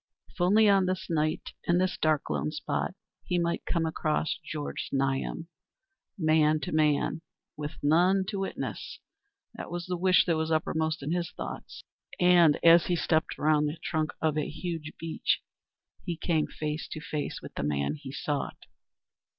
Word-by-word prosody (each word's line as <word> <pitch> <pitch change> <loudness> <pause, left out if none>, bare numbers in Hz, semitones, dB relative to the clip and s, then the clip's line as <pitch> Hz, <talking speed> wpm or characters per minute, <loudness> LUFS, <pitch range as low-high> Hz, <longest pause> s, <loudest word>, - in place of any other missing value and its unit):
If - - -9
only 210 +5 +5
on 195 -2 +4
this 185 0 -2
wild - - +1
night, 155 +1 0 0.2
in 175 - +3
this 185 0 +1
dark, 155 -2 +1
lone 75 0 0
spot, - - -3 0.3
he 180 - -1
might 170 0 -1
come 165 -2 +1
across 155 -1 -1
Georg 150 -2 -5
Znaeym, 135 +4 -1 0.7
man 155 -2 +3
to - - -4
man, 155 0 +2 0.3
with 150 +1 -5
none 180 +6 +4
to 200 - -3
witness—that 400 - -7
was 175 0 -4
the 180 - -2
wish 185 +1 +4
that 170 - +2
was 160 0 -1
uppermost 160 -1 0
in 145 - -2
his 175 -1 -1
thoughts. 65 -1 -7 0.4
And 175 -4 +6
as 170 0 +7
he 180 - +2
stepped 160 -1 0
round 150 0 +3
the 155 - -6
trunk 155 -2 -1
of 155 -1 +2
a 150 - -2
huge 160 -1 -5
beech 165 -1 0 0.6
he 170 - -3
came 160 -2 +1
face 150 0 -4
to - - -5
face 150 -1 -4
with - - -9
the - - -3
man 70 -1 0
he 140 -3 -8
sought. 145 +1 -3
160 Hz, 165 wpm, -29 LUFS, 150-175 Hz, 0.7 s, as